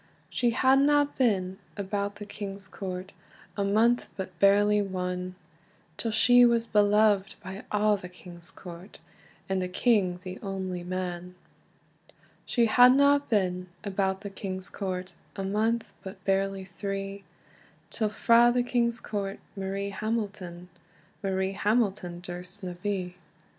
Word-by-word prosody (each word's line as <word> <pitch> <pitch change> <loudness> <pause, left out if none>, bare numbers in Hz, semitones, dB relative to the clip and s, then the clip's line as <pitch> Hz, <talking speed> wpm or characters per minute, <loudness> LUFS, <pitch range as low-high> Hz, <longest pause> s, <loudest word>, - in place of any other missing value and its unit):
She 240 - +2
hadna 275 +4 +4
been 190 -6 +1 0.2
about 200 0 -2
the 205 0 -8
king's 200 -1 -7
court 185 0 -6 0.4
A 200 - 0
month, 225 +5 +2
but 185 -3 -6
barely 205 +2 +5
one, 180 -1 -3 0.6
Till 230 - -3
she 245 +3 +6
was 235 -1 +4
beloved 205 -2 +3
by 190 +3 -7
a' 210 0 +3
the 180 -2 -9
king's 175 -1 -12
court, 180 +2 -11 0.5
And 190 -1 0
the 180 - -1
king 185 -3 +2
the 185 0 -7
only 190 -3 -4
man. 180 0 -4 1.1
She 240 -2 +3
hadna 270 +5 +6
been 185 -4 0 0.2
about 190 -1 -1
the 200 -1 -6
king's 190 -1 -6
court 185 -2 -4 0.2
A 195 - -3
month, 220 +4 0
but 190 -1 -10
barely 195 0 0
three, 195 +1 -5 0.7
Till 220 -2 0
frae 235 +2 +5
the 245 0 +2
king's 235 -1 +1
court 200 -3 -4 0.2
Marie 195 +1 -3
Hamilton, 200 -5 -4 0.5
Marie 190 -1 0
Hamilton 200 -4 0
durst 180 +2 -8
na 180 -1 -4
be. 185 -3 -3
195 Hz, 130 wpm, -28 LUFS, 185-215 Hz, 1.1 s, she